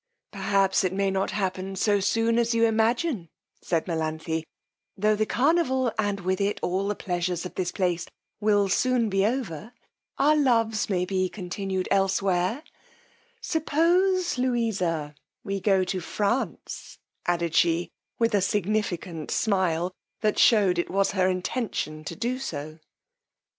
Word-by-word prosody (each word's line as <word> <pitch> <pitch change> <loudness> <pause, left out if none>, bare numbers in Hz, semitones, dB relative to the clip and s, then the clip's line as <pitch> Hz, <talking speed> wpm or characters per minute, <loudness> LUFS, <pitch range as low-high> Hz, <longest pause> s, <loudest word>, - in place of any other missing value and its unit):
Perhaps 195 -1 +2
it 185 -1 0
may 195 0 +1
not 190 0 0
happen 190 -1 -2
so 205 +1 +2
soon 225 +4 +2
as 235 0 +1
you 230 0 +4
imagine, 225 - +1 0.3
said 165 -2 0
Melanthe: 160 -1 -2 0.5
tho' 215 +2 +3
the 215 +1 0
carnival, 265 -3 +2
and 205 -2 0
with 185 +2 -1
it 200 +1 0
all 190 +2 0
the 205 - -1
pleasures 175 -1 -2
of 180 - -6
this 180 -2 -2
place 175 -3 -1 0.3
will 205 -1 +3
soon 240 +3 +2
be 195 0 +2
over, 225 - -4 0.4
our 295 +3 +4
loves 230 -8 +2
may 180 -2 +1
be 185 0 0
continued 190 0 -3
elsewhere: 195 - +1 0.8
suppose, 345 - +2
Louisa, 195 - 0 0.3
we 195 -2 -2
go 190 -1 +3
to 185 +1 -2
France, 205 - -3 0.3
added 170 -2 0
she 170 +1 +2 0.3
with 230 -1 +1
a 200 - +3
significant 195 -5 -1
smile, 185 -4 +1 0.3
that 215 -1 +1
shewed 200 -6 +5
it 175 - -1
was 195 +1 +1
her 185 -2 +2
intention 185 -5 -3
to - - -5
do 240 +4 -2
so. 155 - -6
195 Hz, 140 wpm, -26 LUFS, 180-230 Hz, 0.8 s, shewed